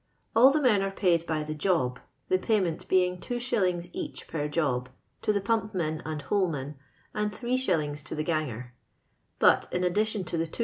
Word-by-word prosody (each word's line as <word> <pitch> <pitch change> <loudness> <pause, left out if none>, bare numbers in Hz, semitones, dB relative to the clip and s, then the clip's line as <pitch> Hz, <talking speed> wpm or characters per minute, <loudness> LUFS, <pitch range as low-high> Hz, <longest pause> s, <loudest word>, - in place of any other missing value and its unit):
All 245 +4 +8
the 295 +3 +2
men 215 -6 +4
are' 195 - 0
paid 175 -4 +1
by 155 -2 -1
the 155 0 -4
job, 150 -7 0 0.3
the 185 - +2
payment 185 -6 0
being 180 -1 +2
2#. 205 -9 -1
each - - -6
per 150 -2 -2
job, 135 -5 0 0.3
to - - +2
the 200 -1 0
pump 220 0 0
men 155 -3 -1
and 155 -2 -4
holeman, 150 -5 -1 0.4
and 210 0 -1
85. 205 - 0
to - - -5
the 155 - -1
ganger; 130 -7 -2 0.6
but - - +4
in 180 - 0
addition 210 +3 +1
to 170 - -3
the 165 - 0
2s. 160 - -9
175 Hz, 180 wpm, -28 LUFS, 155-210 Hz, 0.6 s, All